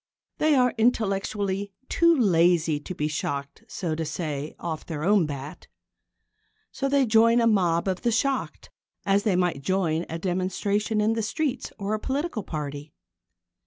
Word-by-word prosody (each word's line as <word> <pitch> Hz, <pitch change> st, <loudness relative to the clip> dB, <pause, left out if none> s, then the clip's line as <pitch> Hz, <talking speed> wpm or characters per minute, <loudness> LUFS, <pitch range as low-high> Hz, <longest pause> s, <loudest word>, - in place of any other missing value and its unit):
They 310 Hz, -1 st, +4 dB
are 250 Hz, -2 st, +3 dB
intellectually 200 Hz, -3 st, 0 dB
too 335 Hz, 0 st, +4 dB
lazy 170 Hz, -, +3 dB
to 180 Hz, +5 st, -7 dB
be 150 Hz, -, -1 dB
shocked, 140 Hz, -2 st, -4 dB
so 170 Hz, -4 st, -3 dB
to 160 Hz, +1 st, -2 dB
say, 155 Hz, -2 st, -4 dB
off 160 Hz, -2 st, -4 dB
their 155 Hz, -3 st, -5 dB
own 195 Hz, -2 st, +3 dB
bat. 145 Hz, +3 st, -7 dB, 1.0 s
So 275 Hz, -, -2 dB
they 280 Hz, -1 st, +3 dB
join 230 Hz, +1 st, +5 dB
a 230 Hz, -, +3 dB
mob 180 Hz, -6 st, +2 dB
of 185 Hz, -1 st, -1 dB
the 240 Hz, -, +1 dB
shocked 265 Hz, +4 st, -1 dB, 0.3 s
as 200 Hz, 0 st, +3 dB
they 205 Hz, -3 st, +1 dB
might 175 Hz, -6 st, 0 dB
join 170 Hz, 0 st, 0 dB
a 165 Hz, -, -3 dB
demonstration 195 Hz, +4 st, -1 dB
in 215 Hz, +2 st, +2 dB
the 225 Hz, -, -1 dB
streets 255 Hz, +6 st, -2 dB
or 200 Hz, +1 st, -2 dB
a 215 Hz, -, -1 dB
political 275 Hz, 0 st, -2 dB
party. 145 Hz, -3 st, -6 dB
195 Hz, 160 wpm, -25 LUFS, 160-225 Hz, 1.0 s, join